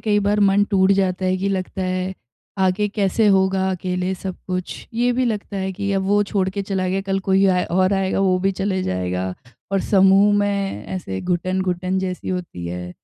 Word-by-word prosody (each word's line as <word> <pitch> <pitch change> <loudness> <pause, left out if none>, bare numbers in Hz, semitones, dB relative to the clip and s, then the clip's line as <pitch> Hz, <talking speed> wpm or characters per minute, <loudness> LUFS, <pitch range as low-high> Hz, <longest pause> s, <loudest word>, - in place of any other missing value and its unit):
कई 210 -2 +2
बार 210 +1 +2
मन 200 0 +4
टूट 190 0 +4
जाता 190 -1 0
है 185 0 +1
कि 195 +2 -1
लगता 190 0 -3
है, 185 0 -2 0.4
आगे 190 +2 +2
कैसे 205 +1 +1
होगा 190 -1 +3
अकेले 180 0 -2
सब 190 0 -6
कुछ? 185 -1 -4
ये 245 +2 +2
भी 255 +1 +1
लगता 210 -3 -3
है 190 0 -2
कि 200 +1 -3
अब 195 -1 +1
वो 205 +1 +3
छोड़ 195 -1 0
के 200 +1 -3
चला 190 -2 -2
गया, 190 +1 0
कल 195 0 -1
कोई 190 0 +2
आए 180 -1 +2
और 185 +2 +2
आएगा 195 0 0
वो 185 -1 +3
भी 195 +1 +1
चले 190 -1 -1
जाएगा, 90 - -2 0.4
और 195 - +2
समूह 195 +1 +5
में 200 - -1
ऐसे 95 - -4
घुटन-घुटन 185 +1 -1
जैसी 185 -1 -4
होती 175 - -4
है। 90 +1 -5
190 Hz, 200 wpm, -21 LUFS, 185-195 Hz, 0.4 s, समूह